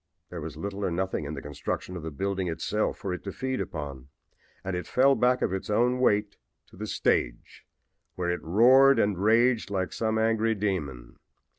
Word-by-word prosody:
There 85 -2 -6
was 75 -1 -7
little 100 +4 -5
or - - +1
nothing 90 -2 -2
in 75 +2 -5
the 70 - -8
construction 75 +5 -5
of 85 - -5
the 80 - -5
building 95 +5 -2
itself 105 +6 -1
for 95 - -4
it 90 - -6
to 100 - -5
feed 130 +3 -3
upon, 70 -5 -6 0.6
and 95 -1 -3
it 90 - -4
fell 135 +2 +4
back 125 -1 +2
of - - 0
its 95 - -4
own 120 +4 +2
weight 105 -4 +1 0.3
to - - -17
the 105 +3 -6
stage, - - -1 0.5
where 90 -1 -1
it 90 - -3
roared 130 +10 +6
and 100 -1 +2
raged 115 +5 +3
like 95 -2 -2
some 110 -1 -1
angry 110 0 +1
demon. 85 - -3
100 Hz, 190 wpm, -27 LUFS, 85-110 Hz, 0.6 s, roared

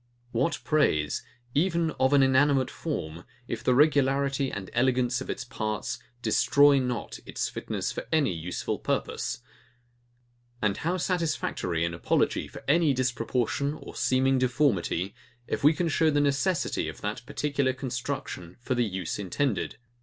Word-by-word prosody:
What 135 +8 +1
praise, 75 - +2 0.3
even 170 +1 +2
of 130 +1 +3
an 140 -1 +6
inanimate 135 0 +3
form, 85 - -4 0.2
if 115 0 -4
the 125 - +3
regularity 140 -1 +3
and 100 -2 -5
elegance 125 -1 +2
of - - -7
its - - -3
parts 110 -3 -3 0.2
destroy 145 -1 +5
not 125 -4 -3
its - - -2
fitness - - -3
for - - -6
any 145 - +3
useful 85 +2 -3
purpose! - - -2 1.2
And 105 -3 +1
how 175 +3 -1
satisfactory 160 - -1
an 85 - -2
apology 85 - +1
for - - -11
any 150 -1 +4
disproportion 130 +2 0
or - - -10
seeming 130 +1 +2
deformity, 120 - +1 0.3
if - - -3
we 150 - +8
can 170 +2 -1
show 160 0 +3
the 145 -1 +2
necessity 145 +5 +1
of - - -10
that 105 +2 -3
particular 140 -3 0
construction 125 -8 -5
for 125 +1 -2
the 120 -1 +2
use 95 -4 -3
intended! 105 +5 -1
130 Hz, 145 wpm, -28 LUFS, 110-145 Hz, 1.2 s, we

